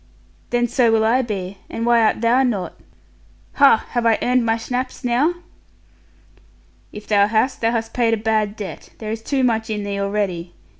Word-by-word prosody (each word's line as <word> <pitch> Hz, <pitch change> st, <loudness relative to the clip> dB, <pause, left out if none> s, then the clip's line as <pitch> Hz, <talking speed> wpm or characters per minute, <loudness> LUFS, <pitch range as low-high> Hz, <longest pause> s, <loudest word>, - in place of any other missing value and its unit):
'Then 240 Hz, 0 st, +1 dB
so 240 Hz, -1 st, +2 dB
will 220 Hz, -1 st, +3 dB
I 245 Hz, +4 st, +3 dB
be, 195 Hz, -5 st, -5 dB
and 230 Hz, -, -4 dB
why 235 Hz, -1 st, +4 dB
art 220 Hz, 0 st, +2 dB
thou 240 Hz, +3 st, +3 dB
not? 215 Hz, -9 st, -1 dB, 0.8 s
Ha, 280 Hz, -5 st, +5 dB
have 240 Hz, -1 st, 0 dB
I 230 Hz, -1 st, +3 dB
earned 250 Hz, 0 st, +2 dB
my 225 Hz, 0 st, +1 dB
schnapps 250 Hz, +4 st, -4 dB
now?' 255 Hz, +8 st, +1 dB, 1.6 s
'If 210 Hz, 0 st, -10 dB
thou 205 Hz, -1 st, +3 dB
hast, 220 Hz, +5 st, 0 dB
thou 225 Hz, -, +2 dB
hast 230 Hz, -1 st, -2 dB
paid 230 Hz, -2 st, +2 dB
a -, -, -6 dB
bad 215 Hz, -1 st, 0 dB
debt; 205 Hz, -3 st, -8 dB
there 215 Hz, -1 st, -6 dB
is 225 Hz, 0 st, -4 dB
too 265 Hz, +3 st, -1 dB
much 225 Hz, -3 st, 0 dB
in 210 Hz, -1 st, -3 dB
thee 200 Hz, 0 st, -3 dB
already. 200 Hz, -4 st, -2 dB
225 Hz, 185 wpm, -20 LUFS, 210-240 Hz, 1.6 s, Ha